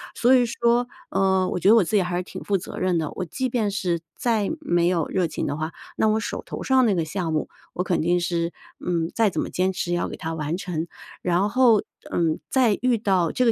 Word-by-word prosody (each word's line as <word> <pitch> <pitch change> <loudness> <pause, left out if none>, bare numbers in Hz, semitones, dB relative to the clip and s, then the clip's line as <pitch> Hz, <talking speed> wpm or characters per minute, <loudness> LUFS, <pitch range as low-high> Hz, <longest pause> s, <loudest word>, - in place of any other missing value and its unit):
所 245 +2 +4
以 250 -2 +5
说， 235 +1 +1 0.2
呃， 190 -1 +2
我 - - -2
觉 190 - +4
得 220 - +8
我 225 - +6
自 180 - -2
己 200 - +5
还 175 -1 -2
是 180 - -1
挺 - - -9
负 200 - +1
责 175 - -8
任 185 -2 +1
的， 155 -2 -2
我 185 - -4
即 255 - -3
便 225 -4 0
是 180 -4 -1 0.2
再 225 -4 +1
没 175 - +2
有 175 -3 +1
热 185 -2 +1
情 160 - -3
的 145 - -2
话， 155 +2 -4 0.2
那 220 - +2
我 215 +1 +2
手 220 - -4
头 - - -6
上 265 -1 +4
那 205 - +2
个 165 -2 0
项 165 +1 -3
目 155 -1 -1 0.3
我 180 - -1
肯 180 -1 0
定 175 +2 +2
是， 170 -1 -1 0.3
嗯， 170 -2 -1
再 225 -2 +3
怎 - - -3
么 - - -1
坚 185 +1 0
持 180 -1 -3
也 175 - +2
要 - - -1
给 - - -7
它 160 - -4
完 155 +1 -2
成。 175 -3 -3 0.3
然 180 +3 +1
后， 235 -2 +4 0.3
嗯， 165 -2 +1
再 250 -6 +3
遇 250 -1 +3
到 190 -6 +1
这 255 - +1
个 230 - +5
185 Hz, 270 characters per minute, -24 LUFS, 170-220 Hz, 0.3 s, 得